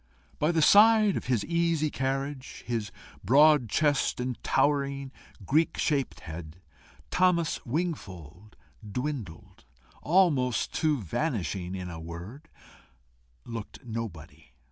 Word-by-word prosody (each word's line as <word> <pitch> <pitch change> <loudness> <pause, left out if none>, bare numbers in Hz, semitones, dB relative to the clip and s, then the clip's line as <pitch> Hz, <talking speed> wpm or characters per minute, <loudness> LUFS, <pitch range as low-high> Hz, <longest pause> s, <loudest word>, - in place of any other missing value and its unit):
By 150 +3 +2
the 160 -2 +2
side 215 +1 +6
of - - -4
his 120 -5 0
easy 170 -3 +1
carriage, 135 0 -3
his 115 -3 -3 0.3
broad 145 +1 +5
chest, 145 -1 +1
and 125 -1 -4
towering 140 -2 0 0.3
Greek 155 - +2
shaped 140 -4 -1
head, 80 +1 -9 0.5
Thomas 180 -3 +2
Wingfold 105 - -5 0.3
dwindled 105 - -6 0.4
almost 150 -8 +2
to 155 -3 +2
vanishing 95 - -2
in 90 -2 -6
a 80 - -7
word, 85 - -9 1.0
looked 115 +1 -8
nobody. 85 -10 -7
130 Hz, 105 wpm, -28 LUFS, 100-155 Hz, 1.0 s, side